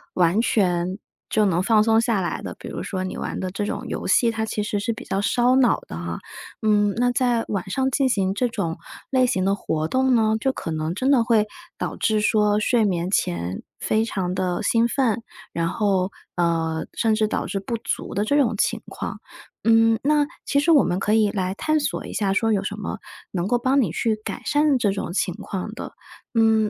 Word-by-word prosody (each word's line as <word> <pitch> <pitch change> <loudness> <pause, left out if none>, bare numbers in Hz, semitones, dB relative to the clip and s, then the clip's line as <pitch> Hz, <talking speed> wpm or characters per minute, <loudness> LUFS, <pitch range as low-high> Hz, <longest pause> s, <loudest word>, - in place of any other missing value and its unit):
完 180 +4 +3
全 185 -5 +1 0.3
就 215 - +2
能 180 -2 +1
放 220 0 +4
松 225 0 +4
下 230 -3 +1
来 175 - -2
的。 - - -6
比 - - -9
如 - - -5
说 190 -2 -3
你 185 - -5
玩 - - -4
的 185 - -2
这 195 +3 -3
种 - - -4
游 - - -4
戏， 235 - +4
它 220 -1 -2
其 215 -1 -2
实 210 0 -2
是 205 +3 -1
比 225 - -7
较 195 - -1
烧 245 +4 +3
脑 255 -3 +4
的 - - -7
啊， 85 0 -5 0.4
嗯， 210 -1 +3
那 245 +1 +2
在 245 -2 +1
晚 190 -2 -3
上 265 +6 0
进 265 0 +2
行 195 -5 +1
这 245 +5 0
种 170 -8 -3 0.3
类 260 -1 +3
型 185 -6 0
的 195 +1 +2
活 155 -5 -2
动 260 +5 +2
呢， 220 -1 +3
就 265 +4 0
可 215 - -6
能 155 +1 -2
真 255 +8 0
的 265 -5 +5
会 225 -2 +3 0.3
导 - - -3
致 215 -1 +1
说 210 -1 +3
睡 230 +1 +2
眠 180 -3 0
前 85 - -1 0.2
非 220 +1 +1
常 185 -5 -2
地 180 +1 -1
兴 230 +2 +3
奋。 235 -3 0 0.3
然 165 0 0
后， 195 -2 0 0.2
呃， 165 -2 0
甚 225 -1 +1
至 215 0 +1
导 - - -2
致 195 +2 -3
不 230 +4 -3
足 - - -4
的 205 - +1
这 285 - +1
种 240 -6 +2
情 - - 0
况， - - -6 0.4
嗯， 225 0 +4
那 295 +1 +3 0.2
其 280 - +2
实 290 +4 +3
我 295 -4 +6
们 180 - 0
可 210 +2 +1
以 215 -2 +4
来 185 -2 -1
探 310 +7 +1
索 290 - -2
一 - - -8
下 195 -2 0
说 225 +3 +1
有 195 -2 0
什 205 - -3
么 205 - -4 0.3
能 180 -1 -2
够 245 - +2
帮 260 +3 +2
你 205 -10 0
去 220 +5 0
改 - - -5
善 295 -2 +3
这 205 -4 +2
种 195 - -4
情 180 -1 0
况 190 +2 -5
的。 - - -7 0.4
嗯， 220 -2 +3
215 Hz, 235 characters per minute, -23 LUFS, 185-235 Hz, 0.4 s, 我